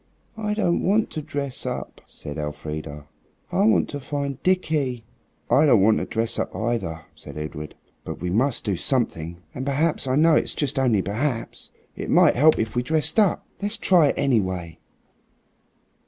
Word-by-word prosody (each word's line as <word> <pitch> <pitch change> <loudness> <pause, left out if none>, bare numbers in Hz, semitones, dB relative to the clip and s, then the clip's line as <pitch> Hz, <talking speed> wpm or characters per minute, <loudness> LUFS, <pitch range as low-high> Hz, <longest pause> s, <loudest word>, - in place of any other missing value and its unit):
"I 210 -1 -2
don't 175 -5 +1
want 210 +4 +1
to 155 - -4
dress 145 -3 -4
up," - - -5
said 75 +1 -8
Elfrida; 75 0 -6 0.5
"I 190 +3 +2
want 220 -1 +4
to 145 - -5
find 140 -1 -4
Dickie." 150 -10 0 0.4
"I 150 +3 +4
don't 110 -8 +5
want 110 +1 +4
to - - -2
dress 115 +1 -2
up - - -3
either," 110 -9 -2
said - - -11
Edred; 75 0 -6 0.3
"but - - -6
we 90 - -3
must 120 +6 +1
do 100 -3 0
something, 85 - -2
and 130 - -5
perhaps, 145 +1 0
I 130 - +1
know 160 +3 +5
it's - - +1
just 145 -2 0
only 115 -7 +2
perhaps, 115 +4 -3 0.3
it - - -6
might - - +5
help 155 +5 +5
if 110 +1 -2
we 120 - +2
dressed 155 - 0
up. 205 -4 +2 0.2
Let's 205 +2 -2
try 180 -7 +4
it, - - -1
anyway." 95 - 0
130 Hz, 170 wpm, -24 LUFS, 95-155 Hz, 0.5 s, don't